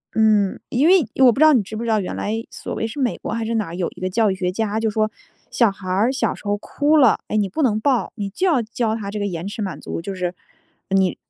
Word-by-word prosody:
嗯， 215 -3 +3
因 275 +6 +2
为 365 -5 +5 0.2
我 245 - +8
不 265 - -4
知 310 - +7
道 310 - +7
你 245 - +4
知 215 - -8
不 220 - -4
知 235 - -2
道 220 - +3
原 190 - -4
来 225 +2 -2
所 - - -7
谓 225 - -2
是 230 - -7
美 255 -3 +1
国 - - -5
还 225 -1 -2
是 230 - -2
哪 205 -7 -2
有 175 -2 -1
一 - - -13
个 185 - -1
教 215 +1 +2
育 - - -2
学 180 -1 -1
家 220 +1 -1
就 225 -1 0
说， 215 0 0 0.4
小 230 -4 +3
孩 195 -1 -11
儿 205 +7 +2
小 270 - 0
时 - - -16
候 205 0 0
哭 295 +8 +1
了， 265 -6 +5
哎， 215 - -1
你 205 - +2
不 255 - -3
能 215 -5 +2
抱， 255 0 +1
你 205 -3 -3
就 375 - 0
要 315 -8 +3
教 225 0 -1
他 200 -3 -5
这 210 - -4
个 205 - -1
延 175 -1 -4
迟 210 +2 -5
满 185 -8 -4
足， - - -5
就 195 +2 -5
是 180 -1 -2 0.6
你 190 -2 +2
215 Hz, 310 characters per minute, -21 LUFS, 195-235 Hz, 0.6 s, 我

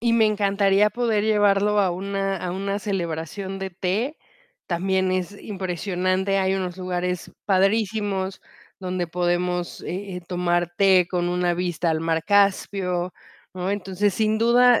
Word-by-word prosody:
Y 235 0 +2
me 225 -1 +5
encantaría 200 0 +3
poder 230 -3 0
llevarlo 205 -1 +3
a 195 -2 +3
una 195 +1 -2
a 180 0 -4
una 195 +2 -2
celebración 190 0 -4
de 190 0 -4
té. 195 - -2 0.5
También 190 +1 0
es 185 +2 -3
impresionante, 185 0 -1
hay 190 0 +1
unos 185 -2 -3
lugares 180 -1 -3 0.2
padrísimos 195 -1 +1 0.4
donde 180 -1 -2
podemos, 175 +1 -1
eh, 190 +1 -5
eh, - - -5
tomar 175 -1 0
té 190 -3 +5
con 175 -1 -1
una 180 0 +1
vista 175 -1 -1
al 160 0 0
mar 165 0 0
Caspio, 195 -3 +1 0.4
¿no? 185 +1 -2
Entonces, 200 0 0
sin 215 +1 +1
duda 240 +1 +5
190 Hz, 140 wpm, -23 LUFS, 180-205 Hz, 0.5 s, me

